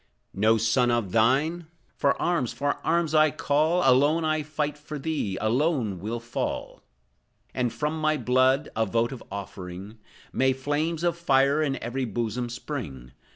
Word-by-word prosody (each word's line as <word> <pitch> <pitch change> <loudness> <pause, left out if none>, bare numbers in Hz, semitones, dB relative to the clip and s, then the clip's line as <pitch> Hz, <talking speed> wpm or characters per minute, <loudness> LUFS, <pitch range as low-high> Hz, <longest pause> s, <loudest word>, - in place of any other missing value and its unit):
No 110 +3 +3
son 115 +3 +2
of 120 -6 0
thine? 140 - +2 0.3
For 140 - +1
arms, 170 -9 0
for 145 0 -1
arms, 165 -1 +1
I 155 0 +5
call; 155 +3 +1
Alone 145 +6 +4
I'll 155 0 +1
fight 150 -1 -2
for 150 0 -8
thee, 135 -10 -2
alone 120 - 0
will 110 +6 -4
fall. 120 +1 -4 0.7
And 125 -2 0
from 150 +6 -3
my 155 0 +2
blood, 130 +3 +2
a 110 0 +1
votive 115 +4 -1
offering, 100 +1 -8 0.3
May 130 0 +2
flames 150 +5 -2
of 170 -1 +1
fire 140 -2 +3
in 140 -3 0
every 130 +3 -2
bosom 120 +1 -3
spring! 85 - -6
130 Hz, 150 wpm, -26 LUFS, 115-155 Hz, 0.7 s, I